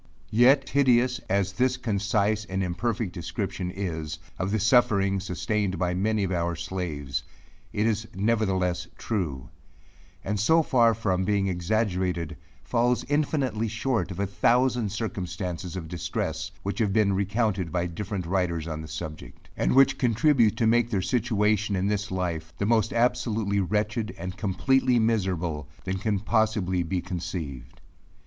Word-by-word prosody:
Yet 130 Hz, +5 st, +5 dB
hideous 125 Hz, -2 st, +3 dB
as 95 Hz, 0 st, +1 dB
this 125 Hz, +4 st, +1 dB
concise 105 Hz, -2 st, 0 dB
and 95 Hz, -1 st, -2 dB
imperfect 95 Hz, +2 st, -2 dB
description 90 Hz, +1 st, -4 dB
is, 80 Hz, -5 st, -4 dB, 0.2 s
of 90 Hz, -, -1 dB
the 110 Hz, +2 st, 0 dB
sufferings 100 Hz, -4 st, +3 dB
sustained 100 Hz, +1 st, -1 dB
by 90 Hz, 0 st, 0 dB
many 105 Hz, +3 st, +1 dB
of 95 Hz, -, -1 dB
our 85 Hz, -1 st, 0 dB
slaves, 85 Hz, -5 st, -3 dB, 0.5 s
it 105 Hz, -, 0 dB
is 110 Hz, -1 st, 0 dB
nevertheless 95 Hz, -4 st, 0 dB
true; 75 Hz, -, -3 dB, 0.7 s
and 105 Hz, +1 st, -2 dB
so 160 Hz, +11 st, +4 dB
far 115 Hz, -5 st, +4 dB
from 95 Hz, -4 st, 0 dB
being 100 Hz, 0 st, +1 dB
exaggerated, 90 Hz, -3 st, -1 dB, 0.3 s
falls 120 Hz, -, +1 dB
infinitely 140 Hz, -6 st, 0 dB
short 115 Hz, -4 st, -1 dB
of 95 Hz, -, -6 dB
a 100 Hz, -, +1 dB
thousand 120 Hz, +2 st, +2 dB
circumstances 90 Hz, -4 st, -4 dB
of 85 Hz, -3 st, -5 dB
distress, 90 Hz, 0 st, -3 dB
which 100 Hz, +4 st, -3 dB
have 105 Hz, -4 st, +1 dB
been 105 Hz, -2 st, +3 dB
recounted 100 Hz, -2 st, 0 dB
by 90 Hz, -1 st, 0 dB
different 95 Hz, +2 st, -4 dB
writers 85 Hz, -3 st, -1 dB
on 80 Hz, -1 st, -4 dB
the 80 Hz, -, -8 dB
subject, 75 Hz, 0 st, -8 dB
and -, -, +1 dB
which 135 Hz, 0 st, +5 dB
contribute 120 Hz, -1 st, +3 dB
to 115 Hz, -, +2 dB
make 120 Hz, +1 st, +3 dB
their 100 Hz, -5 st, 0 dB
situation 105 Hz, -1 st, +1 dB
in 95 Hz, 0 st, 0 dB
this 105 Hz, 0 st, -1 dB
life, 85 Hz, -4 st, -3 dB
the 100 Hz, -, -1 dB
most 110 Hz, -1 st, +2 dB
absolutely 110 Hz, -4 st, +1 dB
wretched, 105 Hz, +3 st, -1 dB
and 90 Hz, +2 st, -5 dB
completely 125 Hz, +7 st, +2 dB
miserable, 90 Hz, -, 0 dB, 0.2 s
that 95 Hz, 0 st, -3 dB
can 105 Hz, -2 st, 0 dB
possibly 105 Hz, -4 st, +1 dB
be 90 Hz, +2 st, -1 dB
conceived. 80 Hz, -9 st, -6 dB
100 Hz, 145 wpm, -26 LUFS, 90-110 Hz, 0.7 s, Yet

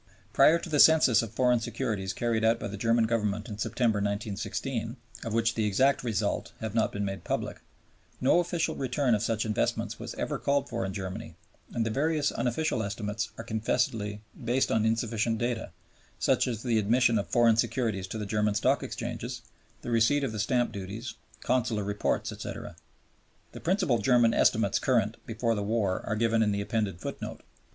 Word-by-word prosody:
Prior 155 Hz, +4 st, +6 dB
to 170 Hz, -, -7 dB
the 150 Hz, -3 st, 0 dB
census 155 Hz, -7 st, +7 dB
of 115 Hz, -2 st, -5 dB
foreign 125 Hz, +1 st, +3 dB
securities 115 Hz, -4 st, -2 dB
carried 115 Hz, -2 st, -1 dB
out 115 Hz, +1 st, +3 dB
by -, -, -4 dB
the 100 Hz, -, -6 dB
German 115 Hz, +2 st, +2 dB
Government 105 Hz, -1 st, -1 dB
in 105 Hz, -3 st, -7 dB
September, 115 Hz, 0 st, +1 dB
1916, 105 Hz, +4 st, -3 dB, 0.3 s
of 115 Hz, -, -4 dB
which 115 Hz, 0 st, +2 dB
the 110 Hz, -, 0 dB
exact 130 Hz, +8 st, +2 dB
results 110 Hz, -6 st, -1 dB
have 110 Hz, -2 st, -4 dB
not 110 Hz, -1 st, +2 dB
been 100 Hz, 0 st, -2 dB
made 95 Hz, 0 st, -4 dB
public, -, -, -3 dB, 0.6 s
no 135 Hz, +7 st, +4 dB
official 175 Hz, -1 st, 0 dB
return 130 Hz, -1 st, 0 dB
of 105 Hz, -, +1 dB
such 115 Hz, -1 st, 0 dB
investments 105 Hz, -1 st, -1 dB
was -, -, -6 dB
ever -, -, -3 dB
called 140 Hz, 0 st, +1 dB
for 115 Hz, -4 st, -3 dB
in 95 Hz, -, -3 dB
Germany, 95 Hz, 0 st, -6 dB, 0.4 s
and 115 Hz, -, -1 dB
the 115 Hz, -, -1 dB
various 150 Hz, +3 st, +1 dB
unofficial 125 Hz, 0 st, -1 dB
estimates 105 Hz, +1 st, -3 dB
are 115 Hz, -, -6 dB
confessedly 110 Hz, -2 st, -1 dB, 0.2 s
based 125 Hz, +3 st, +1 dB
on 110 Hz, 0 st, +2 dB
insufficient 115 Hz, 0 st, 0 dB
data, 120 Hz, 0 st, -2 dB, 0.5 s
such -, -, +2 dB
as 115 Hz, -3 st, -3 dB
the 115 Hz, -3 st, +2 dB
admission 115 Hz, +2 st, +3 dB
of 100 Hz, -, -3 dB
foreign 120 Hz, -2 st, +4 dB
securities 115 Hz, -6 st, 0 dB
to 110 Hz, -, -5 dB
the 105 Hz, -, -3 dB
German 105 Hz, 0 st, 0 dB
Stock -, -, +2 dB
Exchanges, -, -, -5 dB, 0.4 s
the 120 Hz, -, -4 dB
receipts 120 Hz, +5 st, +3 dB
of 130 Hz, -, -3 dB
the 110 Hz, -, -5 dB
stamp 120 Hz, +3 st, +1 dB
duties, 105 Hz, +5 st, -6 dB, 0.3 s
consular 115 Hz, -4 st, 0 dB
reports, 100 Hz, +1 st, -1 dB
etc. -, -, -7 dB, 0.8 s
The -, -, -9 dB
principal 175 Hz, -, +1 dB
German 120 Hz, +1 st, +4 dB
estimates -, -, +3 dB
current -, -, +1 dB
before 115 Hz, +1 st, 0 dB
the 105 Hz, -, -2 dB
war 100 Hz, -3 st, 0 dB
are 110 Hz, -, 0 dB
given 115 Hz, 0 st, +2 dB
in 105 Hz, -2 st, +3 dB
the 100 Hz, 0 st, -1 dB
appended 100 Hz, -4 st, -2 dB
footnote. -, -, -6 dB
115 Hz, 180 wpm, -28 LUFS, 105-120 Hz, 0.8 s, census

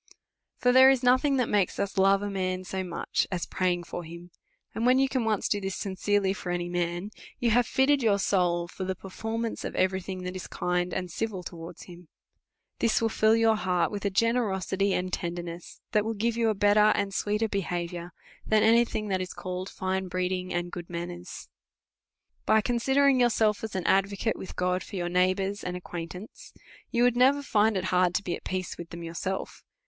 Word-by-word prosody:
For 250 Hz, -, +3 dB
there 260 Hz, +1 st, +8 dB
is 265 Hz, -2 st, +2 dB
nothing 260 Hz, +3 st, +4 dB
that 250 Hz, -, +1 dB
makes 200 Hz, -3 st, +1 dB
us 200 Hz, -, -2 dB
love 195 Hz, +1 st, +4 dB
a 205 Hz, -, -2 dB
man 185 Hz, -1 st, -2 dB
so 190 Hz, 0 st, -4 dB
much, 175 Hz, -2 st, -2 dB
as 180 Hz, -2 st, -2 dB
praying 180 Hz, -1 st, 0 dB
for 175 Hz, -, -6 dB
him; 170 Hz, +2 st, -11 dB, 0.4 s
and, 225 Hz, -, -3 dB
when 250 Hz, +1 st, +5 dB
you 270 Hz, 0 st, +3 dB
can 260 Hz, -3 st, -1 dB
once 215 Hz, -3 st, 0 dB
do 205 Hz, -, 0 dB
this 195 Hz, 0 st, -3 dB
sincerely 195 Hz, 0 st, 0 dB
for 190 Hz, -, -7 dB
any 175 Hz, 0 st, -2 dB
man, 175 Hz, +3 st, -2 dB, 0.3 s
you 240 Hz, -3 st, +1 dB
have 240 Hz, +1 st, +3 dB
fitted 275 Hz, +1 st, +3 dB
your 215 Hz, -4 st, +3 dB
soul 175 Hz, -3 st, +1 dB
for 185 Hz, -, -7 dB
the 190 Hz, 0 st, -2 dB
perform 225 Hz, +5 st, -4 dB
ance 225 Hz, -, -5 dB
of -, -, -5 dB
every 190 Hz, 0 st, +1 dB
thing 185 Hz, 0 st, -6 dB
that 180 Hz, +1 st, -5 dB
is 185 Hz, -, -6 dB
kind 180 Hz, 0 st, -1 dB
and 180 Hz, -1 st, -3 dB
civil 200 Hz, -1 st, -3 dB
towards 170 Hz, 0 st, -9 dB
him. 175 Hz, -1 st, -13 dB, 0.7 s
This 230 Hz, -, +2 dB
will 225 Hz, -, +1 dB
fill 220 Hz, 0 st, +3 dB
your 225 Hz, -1 st, +4 dB
heart 180 Hz, -4 st, 0 dB
with 205 Hz, -1 st, -5 dB
a 200 Hz, -, +1 dB
generqsity 200 Hz, -3 st, +1 dB
and 185 Hz, -1 st, -1 dB
tender 175 Hz, 0 st, -3 dB
ness, 170 Hz, 0 st, -9 dB
that 210 Hz, -2 st, +3 dB
will 225 Hz, +1 st, -3 dB
give 225 Hz, +2 st, 0 dB
you 230 Hz, -1 st, +2 dB
a 215 Hz, -, 0 dB
better 205 Hz, +1 st, +5 dB
and 200 Hz, -1 st, -1 dB
sweeter 210 Hz, +3 st, 0 dB
behaviour, 175 Hz, -3 st, -3 dB, 0.3 s
than 215 Hz, -1 st, +3 dB
any 230 Hz, +2 st, +5 dB
thing 215 Hz, -2 st, -4 dB
that 190 Hz, -1 st, 0 dB
is 185 Hz, -, -6 dB
called 185 Hz, 0 st, -5 dB
fine 190 Hz, 0 st, -2 dB
breeding 185 Hz, 0 st, -2 dB
and 175 Hz, 0 st, -2 dB
good 175 Hz, -1 st, -7 dB
manners. 175 Hz, +1 st, -7 dB, 1.0 s
By 220 Hz, -, +5 dB
considering 265 Hz, +3 st, +3 dB
yourself 225 Hz, -4 st, +2 dB
as 220 Hz, -3 st, -5 dB
an 185 Hz, -2 st, -2 dB
advocate 200 Hz, +3 st, +1 dB
with 190 Hz, -, -9 dB
God 180 Hz, 0 st, 0 dB
for 200 Hz, -, -9 dB
your 175 Hz, -2 st, -2 dB
neighbours 185 Hz, +3 st, +1 dB
and 180 Hz, 0 st, -3 dB
acquaintance, 180 Hz, +3 st, -8 dB, 0.4 s
you 240 Hz, 0 st, +1 dB
would 245 Hz, -1 st, +4 dB
never 270 Hz, +3 st, +4 dB
find 215 Hz, -4 st, +2 dB
it 185 Hz, -, -2 dB
hard 180 Hz, 0 st, +3 dB
to 200 Hz, -, 0 dB
be 175 Hz, -3 st, -2 dB
at -, -, -12 dB
peace 185 Hz, -1 st, -4 dB
with 170 Hz, -1 st, -7 dB
them 170 Hz, 0 st, -8 dB
yourself. 170 Hz, +3 st, -4 dB
190 Hz, 205 wpm, -27 LUFS, 180-220 Hz, 1.0 s, there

